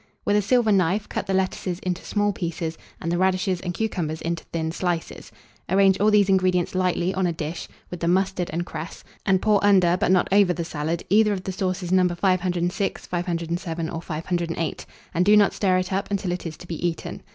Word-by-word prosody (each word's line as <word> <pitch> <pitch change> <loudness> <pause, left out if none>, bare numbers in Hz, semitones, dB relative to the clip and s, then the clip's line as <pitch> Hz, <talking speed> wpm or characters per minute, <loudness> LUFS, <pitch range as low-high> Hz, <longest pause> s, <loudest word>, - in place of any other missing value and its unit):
With 205 - +2
a 210 - +4
silver 225 +2 +2
knife, 195 +1 +2
cut - - -4
the 195 - 0
lettuces 185 -1 -1
into 185 0 -3
small 205 -1 0
pieces, 165 -2 -3 0.2
and 165 - -3
the 175 - 0
radishes 185 -1 +1
and 180 - -3
cucumbers 175 -5 -2
into 170 0 -3
thin 160 -1 -3
slices; 175 -1 -3 0.4
arrange 190 +1 +4
all 210 +2 +4
these 210 -2 +4
ingredients 185 -2 +2
lightly 185 0 0
on 190 -1 +1
a - - 0
dish, 165 0 -5 0.2
with 180 - -5
the 170 - -1
mustard 185 0 +1
and 170 +2 -2
cress, 165 +1 -7 0.2
and 190 -1 +3
pour 210 -2 +3
under, 185 -3 +5
but 205 - 0
not 185 -1 +4
over 200 -3 +5
the 170 -1 -4
salad, 160 +1 -3
either 210 +1 +4
of 185 -2 -4
the 190 - -3
sauces 185 -2 -2
No. 185 -1 +4
506, 180 +1 0
507, 170 -1 -3
or 165 - -4
508, 165 0 -3 0.3
and 180 0 +2
do 210 +3 +6
not 205 -1 +4
stir 185 -3 +2
it 185 +1 -2
up 195 +1 -1
until 200 -2 -1
it 180 -1 -3
is 155 - -7
to 180 - -12
be 170 -1 -5
eaten. 170 -2 -3
180 Hz, 210 wpm, -24 LUFS, 170-195 Hz, 0.4 s, do